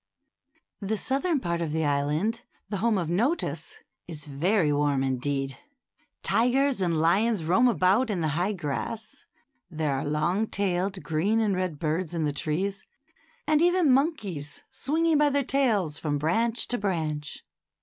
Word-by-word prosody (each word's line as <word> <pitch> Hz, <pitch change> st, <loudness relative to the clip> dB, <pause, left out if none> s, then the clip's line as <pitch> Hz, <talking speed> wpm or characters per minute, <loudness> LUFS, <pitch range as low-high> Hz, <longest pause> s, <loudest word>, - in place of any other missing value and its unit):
The 215 Hz, +1 st, -2 dB
southern 280 Hz, -, 0 dB
part 170 Hz, -5 st, -2 dB
of 160 Hz, -3 st, -2 dB
the 160 Hz, 0 st, 0 dB
island, 150 Hz, +11 st, 0 dB, 0.3 s
the 205 Hz, -, -2 dB
home 220 Hz, +1 st, +1 dB
of 175 Hz, -4 st, -1 dB
Notus, 260 Hz, -, -1 dB, 0.3 s
is 155 Hz, -4 st, -6 dB
very 155 Hz, +3 st, +1 dB
warm 145 Hz, -2 st, +1 dB
indeed. 135 Hz, +1 st, -2 dB, 0.6 s
Tigers 250 Hz, +4 st, +2 dB
and 170 Hz, -3 st, +1 dB
lions 195 Hz, +4 st, +2 dB
roam 185 Hz, +10 st, +4 dB
about 225 Hz, +2 st, +3 dB
in 200 Hz, -4 st, -1 dB
the 160 Hz, -2 st, 0 dB
high 175 Hz, +7 st, 0 dB
grass, 185 Hz, +6 st, -5 dB, 0.4 s
there 155 Hz, -4 st, -1 dB
are 135 Hz, -, -2 dB
long 170 Hz, +9 st, 0 dB
tailed 190 Hz, -1 st, -1 dB
green 180 Hz, +8 st, +1 dB
and 210 Hz, -3 st, +1 dB
red 185 Hz, -4 st, -2 dB
birds 160 Hz, +3 st, -2 dB
in 165 Hz, -, 0 dB
the 150 Hz, -1 st, 0 dB
trees, 190 Hz, +7 st, -2 dB, 0.6 s
and 305 Hz, 0 st, +3 dB
even 350 Hz, -4 st, +4 dB
monkeys 205 Hz, -, -1 dB
swinging 320 Hz, +2 st, +1 dB
by 295 Hz, -1 st, +4 dB
their 285 Hz, 0 st, +1 dB
tails 215 Hz, -, +1 dB
from 145 Hz, -2 st, -1 dB
branch 225 Hz, +11 st, +1 dB
to 245 Hz, -, 0 dB
branch. 155 Hz, -7 st, -3 dB
185 Hz, 150 wpm, -27 LUFS, 155-230 Hz, 0.6 s, roam